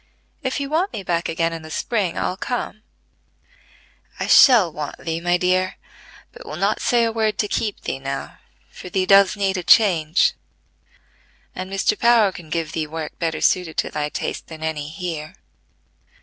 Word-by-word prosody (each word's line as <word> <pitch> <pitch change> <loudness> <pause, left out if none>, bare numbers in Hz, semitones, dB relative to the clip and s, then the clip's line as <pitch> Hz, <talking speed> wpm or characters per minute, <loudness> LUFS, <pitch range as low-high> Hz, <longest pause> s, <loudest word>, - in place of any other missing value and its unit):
If 260 -1 -2
you 280 - -3
want 330 +7 0
me 200 - -5
back 170 -1 -1
again 165 0 0
in 165 - -6
the 155 - -11
spring, 195 +1 -2
I'll 180 - -1
come." 215 0 -4 1.4
"I - - -1
shall 220 - +6
want 150 -1 -6
thee, 165 0 -4
my 175 +1 +2
dear, 185 +1 +1 0.6
but - - -12
will - - -7
not - - 0
say 240 -2 +2
a 230 - +1
word 220 -1 0
to 210 - 0
keep 210 0 -2
thee 135 - -4
now, 135 0 -6 0.3
for 180 - -10
thee 185 +1 0
does 195 +1 +5
need 195 -1 0
a 180 - -3
change, 170 -6 +4 1.2
and 185 +1 -6
Mr. 195 +2 0
Power 235 -4 +4
can 175 -4 -11
give 160 0 -2
thee 160 -2 -3
work 155 0 -7
better 160 -2 -2
suited 180 -3 +1
to - - -1
thy 150 0 -2
taste - - -5
than 160 -1 -9
any 155 -2 -3
here. 165 0 -6
180 Hz, 175 wpm, -21 LUFS, 160-210 Hz, 1.4 s, shall